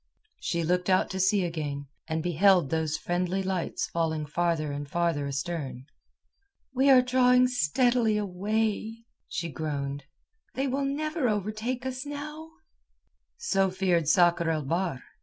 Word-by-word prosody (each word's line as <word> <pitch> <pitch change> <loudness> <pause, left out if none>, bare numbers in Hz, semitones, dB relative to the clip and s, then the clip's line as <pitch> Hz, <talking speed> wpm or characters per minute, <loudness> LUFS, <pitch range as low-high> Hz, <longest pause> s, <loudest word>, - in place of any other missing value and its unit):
She 170 -1 -1
looked 180 +3 0
out 185 0 +3
to 190 - -3
sea 190 0 +3
again, 150 -4 -4 0.2
and 160 0 -2
beheld 175 -2 +3
those 160 -1 0
friendly 180 +2 -1
lights 185 -2 -2
falling 160 -2 -1
farther 155 -1 -1
and 145 0 -5
farther 170 -3 0
astern. 140 -3 -4 0.9
"We 265 +2 +3
are 255 -2 +7
drawing 250 0 +4
steadily 240 - +2
away," 215 +3 -2 0.2
she 165 -1 -4
groaned. 140 -1 -4 0.5
"They 270 - 0
will 275 +2 -1
never 305 -1 -1
overtake 215 +5 -2
us 260 0 -3
now." 300 +2 -7 0.9
So 195 - +1
feared 180 -4 +1
Sakr 170 0 +4
el 155 -3 -1
Bahr. 165 -3 -1
180 Hz, 135 wpm, -28 LUFS, 160-240 Hz, 0.9 s, are